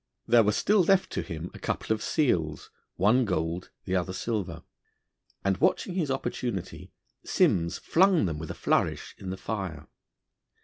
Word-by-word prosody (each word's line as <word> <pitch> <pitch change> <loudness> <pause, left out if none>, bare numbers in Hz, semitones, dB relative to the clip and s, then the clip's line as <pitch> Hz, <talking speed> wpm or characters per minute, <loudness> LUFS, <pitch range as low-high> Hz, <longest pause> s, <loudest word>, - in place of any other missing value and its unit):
There 120 0 +6
were 105 -1 +3
still 205 - +3
left 190 +2 +2
him 85 -1 -4
a - - -10
couple - - -1
of 110 - -4
seals, 85 - 0 0.2
one 110 +8 +4
gold, 85 -3 -2 0.2
the 95 - -1
other 95 0 -1
silver, 105 -1 -3 0.8
and 95 -1 +2
watching 185 - +1
his 170 -6 -1
opportunity, 120 -6 -3 0.3
Simms 85 -1 +2
flung 185 - +3
them 80 -4 -2
with 80 - -6
a - - -5
flourish - - 0
in 95 - -6
the 95 - -4
fire. 95 -7 -4
100 Hz, 150 wpm, -28 LUFS, 85-125 Hz, 0.8 s, There